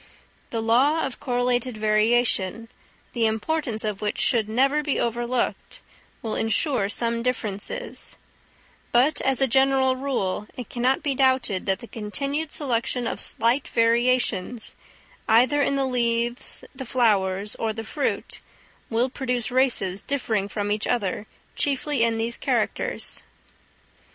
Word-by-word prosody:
The 225 -1 -2
law 270 +8 +3
of 270 - -6
correlated 245 -1 0
variation, 215 0 +2 0.4
the 230 -2 +2
importance 225 +1 -1
of 210 -2 -3
which 210 -1 -1
should 225 -4 +1
never 275 +6 +2
be 290 -2 -1
overlooked, 240 +1 -2 0.4
will 225 - -2
ensure 225 -1 +1
some 230 +2 0
differences; 220 -5 -3 0.7
but, 265 +6 +3
as 270 0 +1
a 270 - +5
general 265 +1 +3
rule, 250 -7 -2
it 250 - -6
cannot 255 +2 +1
be 285 - 0
doubted 260 -8 +1
that 195 +3 +1
the 235 - -9
continued 275 +9 -3
selection 245 -3 0
of - - -3
slight 235 +5 +2
variations, 235 -2 +1 0.6
either 250 +6 +5
in 280 - +1
the 275 -1 +1
leaves, 240 -1 0
the 265 - -7
flowers, 205 -5 +1
or 225 -1 -1
the 225 +1 -6
fruit, 280 +6 -3 0.5
will 235 +2 +1
produce 250 -3 -2
races 240 -7 +1
differing 225 -8 -1
from 205 0 -3
each 210 +1 0
other 210 -3 -1 0.3
chiefly 280 -2 +1
in 230 -1 +2
these 230 +1 -1
characters. - - -2
240 Hz, 130 wpm, -24 LUFS, 220-260 Hz, 0.7 s, a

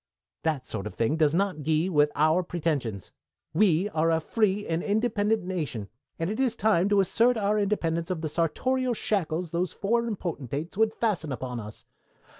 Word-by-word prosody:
That 150 -5 -1
sort 105 -4 -4
of - - -9
thing 115 +7 +1
does 155 -1 +3
not 185 -4 0
gee 155 +3 +1
with 150 -5 +3
our 155 +4 +3
pretensions. 150 - -3 0.4
We 185 0 +3
are 165 -3 +1
a 165 -1 +3
free 205 +3 0
and 165 0 -1
independent 215 0 +1
nation, 150 - -4 0.3
and 165 - -1
it 215 +5 -3
is 255 -4 +1
time 205 -4 +2
to 205 -1 +4
assert 230 +5 +3
our 210 0 +1
independence 170 -5 0
of 180 -4 -2
the 160 - -1
sartorial 245 - 0
shackles 175 -6 -1
those 175 +1 -1
foreign 235 +2 0
potentates 155 - -5
would 220 +1 +2
fasten 190 -10 -1
upon 125 -1 -4
us. 105 0 -10
170 Hz, 175 wpm, -27 LUFS, 155-210 Hz, 0.4 s, to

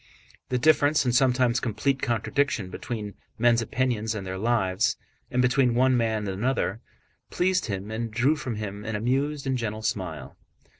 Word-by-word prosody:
The 125 - +1
difference, 150 +1 +4
and 125 - +1
sometimes 125 -1 +3
complete 130 +4 -1
contradiction, 115 -3 0
between 105 -2 -5 0.2
men's 120 0 +4
opinions 115 -2 -1
and 100 -2 -5
their 95 0 -4
lives, 105 -3 +1 0.3
and 125 0 +1
between 125 -1 +3
one 130 +1 +4
man 110 -3 0
and 95 -1 -3
another, 120 -3 0 0.5
pleased 185 -2 +1
him 100 0 -4
and 115 +1 -3
drew 130 +7 +2
from 125 -6 -4
him 105 -1 -5
an 110 0 -3
amused 135 +6 -1
and 130 -1 0
gentle 110 -1 -4
smile. 90 -9 -3
120 Hz, 160 wpm, -26 LUFS, 105-130 Hz, 0.5 s, difference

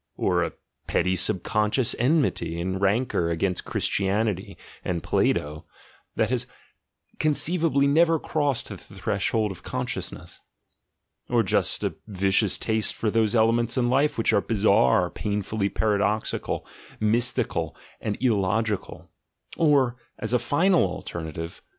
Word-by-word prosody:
or - - +1
a - - -3 0.3
petty 95 0 +1
subconscious 105 +5 +1
enmity 130 - +1
and 95 +2 -3
rancour 100 -3 +1
against 90 +2 -1
Christianity 100 0 -1 0.3
(and 85 -3 -2
Plato), 75 +1 0 0.5
that 110 +2 +1
has 125 -1 -1 0.7
conceivably 155 -1 +1
never 165 +3 +4
crossed 145 -4 -1
the 100 - -7
vshold 100 +2 -2
of 90 -2 -10
consciousness? - - -5 0.9
or - - +3
just - - +1
a - - -1
vicious 100 0 +2
taste 110 -1 0
for 110 - -1
se 110 0 +2
elements 115 +1 +2
of 125 - +2
life 135 +5 +2
which 115 - +2
are 100 - +4
bizarre, 100 - +3
painfully 105 0 -2
para 105 -1 0
doxical, 105 +2 -1 0.3
mystical, 110 - 0 0.2
and 105 -2 -3
illogical? 110 -2 0 0.5
or, 140 -6 +3 0.2
as - - -2
a 125 - +4
final 170 +9 +3
alternative. 85 -2 -5
110 Hz, 120 wpm, -25 LUFS, 95-125 Hz, 0.9 s, never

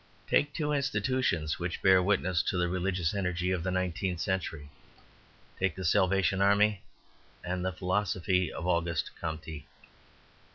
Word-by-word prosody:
Take 145 - +2
two 150 0 -2
institutions 130 - 0
which 85 0 -4
bear 95 -1 +6
witness 90 -3 +1
to 95 - -1
the 90 0 +1
religious 90 -1 -1
energy 90 -2 -1
of 90 -2 0
the 95 - -2
nineteenth 95 -1 -1
century. 80 -6 -3 0.9
Take 95 -3 0
the 95 - -5
Salvation 95 +2 +2
Army 100 0 +3 0.6
and 90 0 -3
the 95 - 0
philosophy 90 -1 0
of 85 - -6
Auguste 85 -2 0
Comte. 80 -1 -5
90 Hz, 135 wpm, -30 LUFS, 85-95 Hz, 0.9 s, bear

